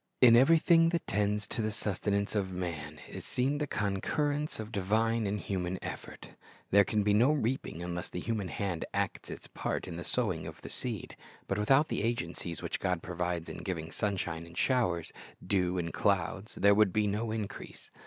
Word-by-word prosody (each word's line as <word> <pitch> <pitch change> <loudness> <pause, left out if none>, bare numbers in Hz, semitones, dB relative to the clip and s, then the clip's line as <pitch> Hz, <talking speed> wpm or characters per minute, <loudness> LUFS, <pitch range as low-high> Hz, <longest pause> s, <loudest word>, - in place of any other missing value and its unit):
In 120 -2 +8
everything 165 +5 +6
that 170 0 -1
tends 105 +1 0
to - - 0
the 110 - 0
sustenance 100 -1 -1
of 100 -3 0
man 80 -5 -4
is - - -7
seen 135 +4 0
the 150 - -1
concurrence 145 +9 -1
of 110 0 -6
divine 110 +2 +1
and 105 +1 -1
human 95 -2 -2
effort. - - -7 0.4
There 100 +1 +7
can 105 +2 +1
be 105 0 +3
no 120 +7 +5
reaping 130 - -1
unless 90 0 -4
the - - -4
human 110 -2 -2
hand 90 -1 -2
acts - - -2
its - - -7
part - - -3
in 85 - -6
the 85 - -5
sowing 90 -11 -1
of 80 - -9
the - - -8
seed. 115 -7 -3 0.3
But 95 - -1
without 135 +8 +4
the - - -1
agencies 85 -7 -2
which - - -2
God 90 -3 -1
provides 90 -1 -2
in - - -6
giving 80 -4 -4
sunshine 90 -5 -2
and 85 +1 -13
showers, 100 -11 +1 0.3
dew 90 -1 +1
and 85 -3 -2
clouds, 100 +2 0
there 100 0 +5
would 105 -2 +4
be 105 +3 +2
no 105 +3 -1
increase. 110 -2 -6
100 Hz, 185 wpm, -31 LUFS, 90-115 Hz, 0.4 s, In